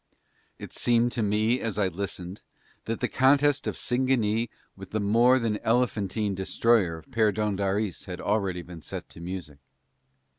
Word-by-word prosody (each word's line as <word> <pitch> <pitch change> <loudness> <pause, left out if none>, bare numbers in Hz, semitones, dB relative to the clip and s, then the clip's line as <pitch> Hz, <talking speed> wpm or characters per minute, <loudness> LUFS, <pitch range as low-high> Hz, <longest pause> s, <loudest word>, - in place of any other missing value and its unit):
It - - -10
seemed 120 0 +2
to 120 - -2
me 110 +4 +2
as 110 -3 -3
I 100 -2 +3
listened 90 +1 -5 0.4
that 115 0 -3
the - - +2
contest 145 +2 +3
of - - -2
Singanee 120 -3 +1 0.3
with 95 -1 -10
the 110 - -2
more 115 +5 +4
than 115 -4 -1
elephantine 110 -3 0
destroyer 95 -2 +2
of 80 - -13
Perdóndaris 105 -3 0
had 90 -1 -6
already 100 -4 -1
been 85 -2 -10
set - - -7
to - - -12
music. 85 -5 -6
105 Hz, 150 wpm, -27 LUFS, 95-115 Hz, 0.4 s, more